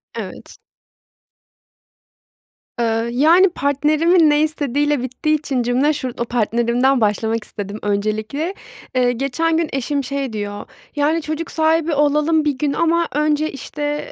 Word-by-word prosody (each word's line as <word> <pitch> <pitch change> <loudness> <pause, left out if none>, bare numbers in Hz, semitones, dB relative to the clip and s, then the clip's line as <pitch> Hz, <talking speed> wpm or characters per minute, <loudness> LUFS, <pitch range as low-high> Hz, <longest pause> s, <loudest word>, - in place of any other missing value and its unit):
Evet. - - -8 2.2
Iıı, 225 0 0
yani, 330 +9 +5
partnerimin 305 +3 +2
ne 295 0 +3
istediğiyle 290 -2 0
bittiği 260 +5 -1
için 270 -4 -2
cümle 255 +6 +2
şu 255 -3 -4
partnerimden 240 +2 +1
başlamak 220 +1 0
istedim 205 +1 -7
öncelikle. 215 - -2 0.4
Eee, 250 -1 +3
geçen 275 +6 0
gün 330 -2 0
eşim 275 +1 -1
şey 275 -2 -3
diyor; 205 -1 -5 0.3
"Yani, 305 +3 +1
çocuk 315 +2 -4
sahibi 320 0 +1
olalım 300 +2 +2
bir 285 -3 0
gün 290 -1 0
ama 335 0 +1
önce, 300 +1 +1
işte, 295 - -5
285 Hz, 125 wpm, -19 LUFS, 240-310 Hz, 2.2 s, yani